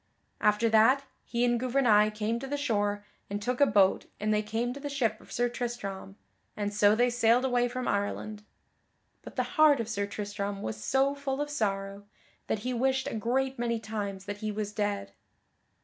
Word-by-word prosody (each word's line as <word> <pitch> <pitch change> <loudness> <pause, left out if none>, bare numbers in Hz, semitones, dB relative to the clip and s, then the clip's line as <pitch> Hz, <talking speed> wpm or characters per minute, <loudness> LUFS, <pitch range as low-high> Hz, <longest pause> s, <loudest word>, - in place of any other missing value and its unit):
After 210 +2 +3
that, 225 +5 +5 0.2
he 240 0 0
and 240 -1 +2
Gouvernail 240 -5 +4
came 215 +2 -2
to 270 - -6
the 290 +2 -2
shore 205 -7 -1 0.2
and 200 +1 -2
took 245 +5 -2
a 285 - +7
boat 200 -2 +3
and 215 +1 +1
they 210 - +2
came 225 +3 -2
to 280 - -8
the 290 0 -5
ship 230 -6 -1
of - - -17
Sir 245 +1 +1
Tristram, 235 -6 -5 0.4
and 205 0 -2
so 205 0 +5
they 245 +2 +3
sailed 240 +1 +3
away 245 -1 +2
from 250 +1 -4
Ireland. 205 +1 -2 0.8
But - - -11
the - - +1 0.2
heart 295 -4 +7
of 230 - -2
Sir 205 -3 -2
Tristram 200 -1 -4
was 110 0 -5
so 270 - +2
full 280 -1 -3
of 295 0 -2
sorrow 200 -5 -2 0.4
that 220 - -1
he 255 - -1
wished 265 +2 +1
a - - -3
great 260 +4 -1
many 235 -1 0
times 205 -3 -5
that 205 0 -5
he 215 0 -3
was 210 0 -4
dead. 205 -1 -2
220 Hz, 195 wpm, -29 LUFS, 205-250 Hz, 0.8 s, a